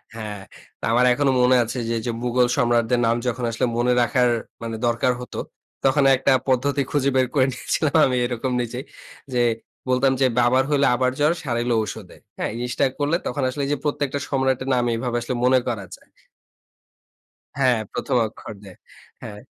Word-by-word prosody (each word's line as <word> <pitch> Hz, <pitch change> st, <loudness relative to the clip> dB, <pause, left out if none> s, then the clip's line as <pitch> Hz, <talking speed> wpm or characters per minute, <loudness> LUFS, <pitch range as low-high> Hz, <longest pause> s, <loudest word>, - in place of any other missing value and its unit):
হ্যাঁ। 105 Hz, -3 st, -6 dB, 0.4 s
তো -, -, -30 dB
আমার 125 Hz, +2 st, +4 dB
এখনো 140 Hz, 0 st, +1 dB
মনে 125 Hz, +1 st, +5 dB
আছে 115 Hz, +3 st, -5 dB
যে, 115 Hz, -, 0 dB
যে 120 Hz, -, -1 dB
মুঘল 125 Hz, 0 st, +2 dB
সম্রাটদের 120 Hz, -1 st, +2 dB
নাম 115 Hz, -, +2 dB
যখন 125 Hz, 0 st, -2 dB
আসলে 115 Hz, -, 0 dB
মনে 125 Hz, +1 st, +2 dB
রাখার 125 Hz, 0 st, +2 dB, 0.3 s
মানে 115 Hz, -1 st, -4 dB
দরকার 120 Hz, +2 st, +1 dB
হতো, 125 Hz, -, -8 dB, 0.5 s
তখন 135 Hz, +1 st, +3 dB
একটা 135 Hz, +1 st, +1 dB, 0.2 s
পদ্ধতি 140 Hz, +2 st, +1 dB
খুঁজে 140 Hz, -2 st, +1 dB
বের 130 Hz, -1 st, +3 dB
করে 130 Hz, -3 st, +4 dB
নিয়েছিলাম 155 Hz, +4 st, -1 dB
আমি 125 Hz, -1 st, 0 dB
এরকম 120 Hz, +1 st, -3 dB
নিজেই 120 Hz, +3 st, -5 dB, 0.5 s
যে 120 Hz, -, +2 dB, 0.5 s
বলতাম 130 Hz, +1 st, +3 dB
যে, -, -, +5 dB
"বাবার 125 Hz, +2 st, +3 dB
হইলে 140 Hz, -1 st, +3 dB
আবার 130 Hz, 0 st, +1 dB
জ্বর 150 Hz, +3 st, +3 dB
সারাইলো 120 Hz, -2 st, 0 dB
ঔষুধে।" 105 Hz, -3 st, -8 dB, 0.2 s
হ্যাঁ? -, -, -2 dB
এই 115 Hz, -, -6 dB
জিনিসটা 125 Hz, +2 st, 0 dB
করলে 145 Hz, +3 st, +1 dB
তখন 140 Hz, -, -2 dB
আসলে 140 Hz, +3 st, -4 dB
এই -, -, -4 dB
যে -, -, -1 dB
প্রত্যেকটা 145 Hz, -1 st, -1 dB
সম্রাটের 130 Hz, -1 st, 0 dB
নাম 125 Hz, -, +1 dB
এভাবে 120 Hz, 0 st, -2 dB
আসলে 125 Hz, +1 st, -3 dB
মনে 130 Hz, 0 st, +5 dB
করা 105 Hz, -5 st, -3 dB
যায়। -, -, -25 dB, 1.5 s
হ্যাঁ, 125 Hz, -4 st, +3 dB
১ম 135 Hz, -, -2 dB
অক্ষর 110 Hz, -, -10 dB
দে 95 Hz, -, -11 dB, 0.5 s
হ্যাঁ। 105 Hz, -2 st, -9 dB
125 Hz, 180 wpm, -22 LUFS, 120-135 Hz, 1.5 s, মনে